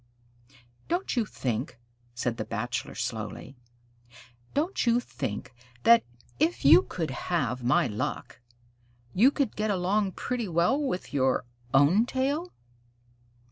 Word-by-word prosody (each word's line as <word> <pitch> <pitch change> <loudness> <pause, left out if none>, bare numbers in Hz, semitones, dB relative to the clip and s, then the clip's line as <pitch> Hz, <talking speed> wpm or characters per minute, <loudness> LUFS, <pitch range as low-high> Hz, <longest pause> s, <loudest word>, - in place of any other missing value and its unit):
"Don't 350 -1 -1
you 230 -4 +1
think?" 125 - -3 0.4
said 120 -1 -2
the - - -2
Bachelor - - -4
slowly, 135 - -5 1.0
"don't 310 -1 0
you 235 +1 +4
think 125 - -5 0.3
that, 235 0 +7 0.4
if 320 - +1
you 160 +6 +9
could 165 -5 -4
have 130 -5 -2
my 125 +2 +3
luck, 105 +2 -4 0.7
you 230 +8 +6
could 280 -5 -1
get 215 0 -1
along 195 +1 +1
pretty 245 -3 -3
well 180 - +2
with 255 - -3
your 130 -2 +1 0.3
own 160 - +4
tail?" 285 +8 -1
185 Hz, 120 wpm, -28 LUFS, -, 1.0 s, you